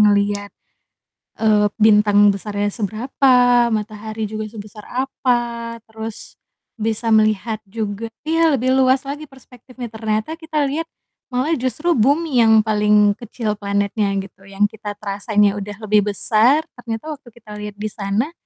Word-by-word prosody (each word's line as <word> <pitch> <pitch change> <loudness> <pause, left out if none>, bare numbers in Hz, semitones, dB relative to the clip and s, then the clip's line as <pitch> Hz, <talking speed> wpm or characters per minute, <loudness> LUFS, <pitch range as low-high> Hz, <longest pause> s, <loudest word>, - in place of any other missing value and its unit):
ngelihat, 205 -1 +2 0.9
eee, 210 -1 +4
bintang 210 -1 +5
besarnya 205 +1 -3
seberapa, 240 +6 +1 0.4
matahari 215 0 -4
juga 215 0 -4
sebesar 210 -1 -11
apa, 240 -3 -2
terus 220 0 -9 0.4
bisa 225 +1 -1
melihat 215 0 +2
juga 215 +1 -4 0.2
iya, 325 -1 +3
lebih 255 0 0
luas 260 0 +3
lagi 290 +2 -6
perspektifnya. 250 -2 -11
Ternyata 220 +7 -3
kita 315 -2 -1
lihat 300 +4 -2 0.4
malah 255 +5 -1
justru 280 +7 -1
bumi 285 +3 +2
yang 220 -1 +6
paling 210 -1 +3
kecil 225 -2 -3
planetnya 200 0 0
gitu, 195 0 -16
yang 195 +1 -2
kita 210 -1 -7
terasanya 205 0 0
udah 205 +1 -6
lebih 210 -1 +2
besar, 240 +11 +3 0.2
ternyata 240 +6 -5
waktu 255 -4 -16
kita 215 -2 -15
lihat 210 -1 -7
di 210 +1 -5
sana 205 +9 -2
220 Hz, 135 wpm, -20 LUFS, 210-250 Hz, 0.9 s, yang